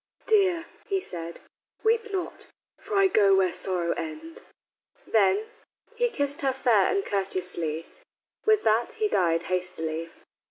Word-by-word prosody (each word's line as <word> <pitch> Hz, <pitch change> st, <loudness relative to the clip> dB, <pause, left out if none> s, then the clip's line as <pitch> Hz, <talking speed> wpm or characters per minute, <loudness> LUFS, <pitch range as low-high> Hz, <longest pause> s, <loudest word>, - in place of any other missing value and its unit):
"Dear," 375 Hz, -6 st, +3 dB, 0.2 s
he 390 Hz, -1 st, +1 dB
said, 170 Hz, -, -7 dB, 0.4 s
"weep 450 Hz, -1 st, +1 dB
not, 380 Hz, -3 st, -4 dB, 0.3 s
for 410 Hz, +1 st, -5 dB
I 390 Hz, -, +5 dB
go 205 Hz, -, +5 dB
where 185 Hz, -2 st, +2 dB
sorrows 175 Hz, -3 st, +1 dB
end." 320 Hz, +1 st, -7 dB, 0.6 s
Then 200 Hz, -1 st, +3 dB, 0.5 s
"He 485 Hz, +1 st, +1 dB
kissed 285 Hz, -9 st, -2 dB
her 270 Hz, -2 st, +1 dB
fair 240 Hz, -6 st, +3 dB
and 395 Hz, 0 st, 0 dB
courteously, 180 Hz, -5 st, -2 dB, 0.6 s
With 435 Hz, -1 st, +3 dB
that 220 Hz, +2 st, +2 dB
he 435 Hz, -1 st, 0 dB
died 170 Hz, -, +1 dB
hastily." 165 Hz, -3 st, -2 dB
220 Hz, 130 wpm, -26 LUFS, -, 0.6 s, I